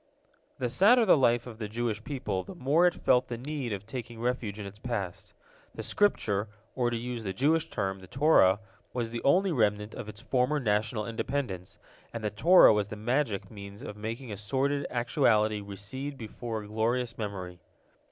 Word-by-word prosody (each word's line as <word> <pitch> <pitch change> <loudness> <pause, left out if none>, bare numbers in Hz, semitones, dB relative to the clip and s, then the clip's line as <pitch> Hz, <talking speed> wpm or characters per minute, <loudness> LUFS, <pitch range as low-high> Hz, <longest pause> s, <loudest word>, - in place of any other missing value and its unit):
The 125 - -1
sadder 215 - +5
the 190 - +7
life 120 -4 +3
of 115 -3 -10
the 110 - -3
Jewish 110 -1 -2
people, 125 -10 -3
the 190 - -10
more 165 +3 +3
it 175 - 0
felt 125 0 +3
the 120 - -4
need 135 -1 -4
of 100 -1 -4
taking 120 0 -7
refuge 120 -4 -2
in 105 - -5
its 100 +1 -10
past. 105 -7 -5 0.4
The - - -5
Scripture, 110 - +1 0.3
or, 125 -2 +1
to 120 - -2
use 120 0 -4
the 95 -2 -3
Jewish 155 +9 +2
term, 95 -3 -2
the 95 - -13
Torah, 115 - +4 0.3
was 120 -2 -2
the 115 - -4
only 185 +7 +3
remnant 105 -5 +1
of 110 - -7
its 105 0 -10
former 130 +5 +1
national 105 -1 0
independence, 115 -5 -3 0.4
and 115 - -4
the 105 - -1
Torah 170 - +7
was 105 -1 0
the 105 - -7
magic 110 -3 -1
means 100 -1 -9
of 105 - -7
making 115 +3 -5
a 100 - -5
sordid 140 +7 -1
actuality 115 -4 +2
recede 100 +8 -6
before 115 -1 -5
a - - -10
glorious 115 +3 -1
memory. 95 -4 -5
115 Hz, 185 wpm, -29 LUFS, 105-130 Hz, 0.4 s, the